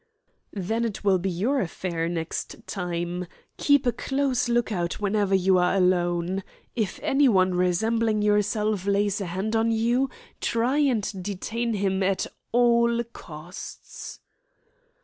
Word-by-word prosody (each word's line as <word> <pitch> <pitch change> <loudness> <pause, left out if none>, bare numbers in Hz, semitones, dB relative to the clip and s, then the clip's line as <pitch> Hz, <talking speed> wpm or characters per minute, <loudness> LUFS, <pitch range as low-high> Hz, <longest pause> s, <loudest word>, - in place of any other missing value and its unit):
"Then 220 +4 -2
it 225 -4 -3
will 195 -2 +3
be 190 +2 -1
your 220 +11 0
affair 170 -2 -2
next 170 +6 -4
time. 175 -1 -3 0.3
Keep 285 -2 +3
a 245 - +3
close 270 -1 0
look 235 -1 +1
out 175 -3 -2
whenever 205 -1 +1
you 190 0 +4
are 180 +2 +2
alone. 180 0 +1 0.3
If 220 -5 -2
anyone 210 -10 +4
resembling 215 +5 +1
yourself 210 -1 +1
lays 200 0 +1
a 195 - -3
hand 190 +6 -2
on 225 +1 +2
you, 235 +4 +2 0.3
try 240 +5 +1
and 220 -9 0
detain 220 +4 -2
him 195 -1 0
at 190 0 +1 0.3
all 235 0 +3
costs." 155 +3 -9
205 Hz, 130 wpm, -25 LUFS, 180-230 Hz, 0.3 s, you